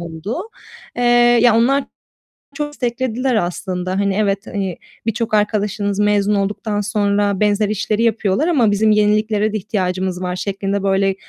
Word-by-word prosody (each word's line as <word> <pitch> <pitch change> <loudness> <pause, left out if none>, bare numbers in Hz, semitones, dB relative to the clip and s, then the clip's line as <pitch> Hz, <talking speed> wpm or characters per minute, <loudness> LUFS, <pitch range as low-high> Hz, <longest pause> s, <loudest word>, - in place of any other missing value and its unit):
oldu. 170 +5 -5 0.6
Eee, 245 - -1 0.4
ya, 235 -2 +5
onlar 270 +4 +2 0.7
çok 295 -1 -2
desteklediler 250 -2 -2
aslında. 180 -1 -2
Hani, 200 -1 0
evet, 200 0 0
hani, 195 -4 -3 0.3
birçok 225 0 -2
arkadaşınız 205 -1 0
mezun 210 0 +2
olduktan 205 +1 -2
sonra 205 -2 0
benzer 210 0 +2
işleri 215 +1 -1
yapıyorlar 225 - +1
ama 255 -11 +3
bizim 215 +2 +2
yeniliklere 215 0 +2
de - - 0
ihtiyacımız 185 -2 -2
var 180 0 -2
şeklinde, 195 +1 -3
böyle, 195 0 +1
205 Hz, 140 wpm, -18 LUFS, 195-220 Hz, 0.7 s, ya